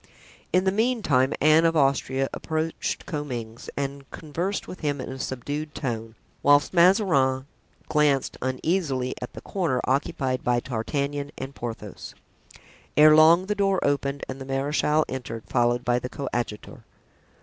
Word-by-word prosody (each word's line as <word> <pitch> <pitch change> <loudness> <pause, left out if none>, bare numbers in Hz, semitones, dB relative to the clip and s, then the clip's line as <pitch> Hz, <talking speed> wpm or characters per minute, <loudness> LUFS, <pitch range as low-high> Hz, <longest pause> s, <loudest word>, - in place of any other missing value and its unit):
In 185 - +3
the 190 - +2
meantime 205 - +2
Anne 155 +2 +5
of 165 0 +3
Austria 135 -2 +2
approached 160 +1 -3
Comminges 120 -8 -5
and 140 0 -4
conversed 170 +6 -4
with 185 - -8
him 145 -2 -1
in 130 - -5
a 130 - -7
subdued 145 +5 -4
tone, 115 -4 -4 0.3
whilst 145 +3 +4
Mazarin 170 - +4 0.4
glanced 150 -3 +2
uneasily 130 0 -1
at 125 - -6
the - - -9
corner 165 -10 -1
occupied 130 -1 -1
by 120 0 +2
D'Artagnan 140 +4 -3
and 135 - -6
Porthos. 110 -5 -7 0.8
Ere 155 0 +8
long 165 +4 +6
the 210 - 0
door 195 -2 +1
opened 140 0 0
and 135 +1 -7
the - - -6
marechal 145 +3 +1
entered, 120 -4 -6
followed 120 0 +1
by 120 0 +2
the 125 - -5
coadjutor. 120 -6 -5
140 Hz, 140 wpm, -25 LUFS, 130-155 Hz, 0.8 s, Ere